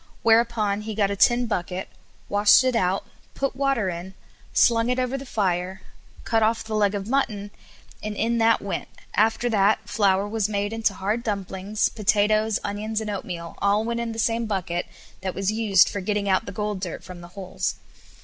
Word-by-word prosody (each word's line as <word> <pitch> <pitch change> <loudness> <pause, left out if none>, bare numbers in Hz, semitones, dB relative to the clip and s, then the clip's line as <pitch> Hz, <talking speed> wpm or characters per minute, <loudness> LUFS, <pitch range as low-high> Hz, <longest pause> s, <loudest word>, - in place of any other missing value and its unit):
Whereupon 225 -3 +3
he 215 0 -5
got 200 -2 +2
a - - -1
tin 240 +4 +4
bucket, 185 -3 -3 0.4
washed 205 +4 +5
it 255 -1 +1
out, 190 -3 +1 0.3
put 275 -1 -1
water 270 -6 +1
in, 180 +2 -5 0.4
slung 230 0 +3
it 250 - +1
over 255 +1 -1
the 270 0 -6
fire, 190 -4 -1 0.4
cut 225 -1 +1
off 225 +1 +2
the 220 0 -6
leg 205 -1 +2
of 200 0 -4
mutton, 215 -6 -1 0.5
and 215 0 -4
in 230 +2 0
that 225 -1 +3
went, 200 - -3 0.3
after 225 +3 +2
that 205 0 +2
flour 200 -1 +2
was 215 -1 -1
made 205 +1 -1
into 225 -3 0
hard 210 +5 -1
dumplings, 200 -1 -1
potatoes, 215 0 +2
onions, 210 +2 -2
and 215 -1 -3
oatmeal 175 -4 -6
all 205 +2 +2
went 235 0 -2
in 235 -1 -2
the 225 - -7
same 230 0 0
bucket 180 -4 -2 0.3
that 185 -1 -3
was 195 +1 0
used 215 -4 +4
for 200 - -3
getting 205 +1 -1
out 190 +3 +1
the - - -4
gold 210 0 -3
dirt 180 -3 -5
from 180 0 -10
the 175 - -10
holes. 185 -2 -3
210 Hz, 190 wpm, -24 LUFS, 195-225 Hz, 0.5 s, washed